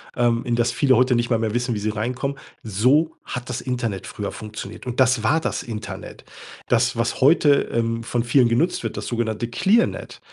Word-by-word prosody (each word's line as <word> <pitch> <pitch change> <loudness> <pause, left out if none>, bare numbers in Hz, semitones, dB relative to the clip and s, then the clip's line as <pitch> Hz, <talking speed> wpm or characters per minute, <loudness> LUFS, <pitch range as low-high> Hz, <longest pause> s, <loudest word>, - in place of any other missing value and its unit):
ähm, 120 -1 +1
in 120 -1 0
das 120 0 +1
viele 135 -3 +3
heute 125 -1 +3
nicht 120 +1 0
mal 115 -2 +2
mehr 110 -1 -1
wissen, 120 0 0
wie - - -2
sie 110 +1 -1
reinkommen, 125 +6 -3 0.3
so 125 - +2
hat 125 +1 -6
das 125 0 -3
Internet 115 -7 -3
früher 100 -1 -5
funktioniert. 110 0 -8
Und 125 +1 -4
das 125 -3 +3
war 155 +8 +2
das - - -2
Internet. 110 -3 -7 0.5
Das, 120 0 +2
was 115 0 -1
heute, 145 0 +5
ähm, 115 0 -1
von 120 0 -1
vielen 125 0 +4
genutzt 125 +10 +1
wird, - - -4
das - - -5
sogenannte 120 -1 -2
Clearnet, 200 - +1
120 Hz, 200 wpm, -22 LUFS, 115-130 Hz, 0.5 s, heute